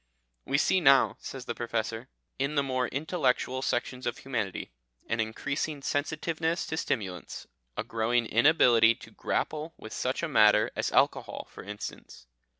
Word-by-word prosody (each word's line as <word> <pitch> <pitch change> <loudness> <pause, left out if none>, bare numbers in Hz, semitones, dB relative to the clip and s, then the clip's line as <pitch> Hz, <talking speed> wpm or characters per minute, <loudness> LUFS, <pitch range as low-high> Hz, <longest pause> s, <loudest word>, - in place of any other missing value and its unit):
"We 140 - +1
see 185 +5 +3
now," 135 -3 +5
says 130 -2 -7
the 120 - -3
Professor, 115 +1 -3 0.3
"in 140 +3 0
the 140 - +3
more 130 -2 0
intellectual 130 -3 0
sections 125 0 -2
of 120 - -2
humanity 115 - -3 0.4
an 115 - -1
increasing 140 +6 -2
sensitiveness 160 +3 -1
to 160 - -4
stimulants, 95 - -3 0.3
a - - -1
growing 115 +1 0
inability 115 -2 +5
to - - -14
grapple 155 +2 -2
with 110 - -9
such 130 +5 -2
a - - +1
matter 110 -6 +5
as - - -1
alcohol, - - +1
for - - -10
instance. 105 -9 -8
130 Hz, 150 wpm, -29 LUFS, 115-145 Hz, 0.4 s, now